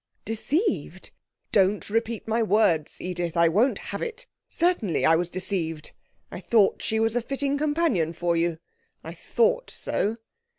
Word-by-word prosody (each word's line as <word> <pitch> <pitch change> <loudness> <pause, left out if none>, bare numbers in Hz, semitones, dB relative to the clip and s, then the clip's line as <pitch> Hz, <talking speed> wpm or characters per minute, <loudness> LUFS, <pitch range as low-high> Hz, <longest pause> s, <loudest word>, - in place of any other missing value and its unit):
'Deceived?' 290 - -2 0.4
'Don't 200 0 +2
repeat 225 +1 -2
my 225 +1 +1
words, 205 -8 +2
Edith. 175 -2 -3
I 170 0 +5
won't 215 +11 +2 0.2
have - - -4
it! 480 +1 -5 0.2
Certainly 330 - +1
I 165 - +6
was 175 +1 -1
deceived. 170 -4 -3 0.4
I - - -6
thought 215 -4 +2
she 220 - -1
was 225 +1 +1
a 245 - +2
fitting 275 +3 -2
companion 290 - +1
for 170 0 0
you 165 -1 0 0.5
I - - -7
thought - - 0
so.' 215 +3 -2
215 Hz, 145 wpm, -25 LUFS, 175-275 Hz, 0.5 s, I